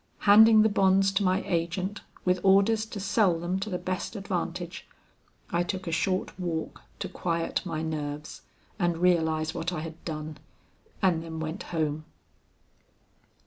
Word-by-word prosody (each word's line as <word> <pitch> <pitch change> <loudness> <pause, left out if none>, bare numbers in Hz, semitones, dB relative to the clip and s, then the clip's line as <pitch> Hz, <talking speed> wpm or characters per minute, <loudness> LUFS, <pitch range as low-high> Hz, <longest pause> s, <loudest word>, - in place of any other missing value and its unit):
Handing 215 +1 +7
the - - +5
bonds 195 -1 +3
to 195 +1 +1
my 185 +1 +2
agent 180 +4 -2 0.2
with 180 0 +2
orders 200 +3 +4
to 215 - -6
sell 190 -3 +2
them 175 +3 -2
to 205 +3 -4
the 180 - -2
best 185 +5 -4
advantage, 180 -3 -4 0.6
I 170 - +2
took 185 +2 -3
a 165 - -3
short 185 +3 -1
walk 170 -3 -3 0.2
to - - -4
quiet 165 -1 -2
my 160 -2 -3
nerves 150 -1 -5 0.4
and 175 -2 +1
realize 160 -3 +2
what 170 +1 -2
I 165 -4 -3
had 165 0 -8
done, 155 -1 -5 0.6
and 175 -4 +3
then 165 -1 -6
went 160 +4 -4
home. 155 -2 -1
175 Hz, 150 wpm, -28 LUFS, 160-195 Hz, 0.6 s, Handing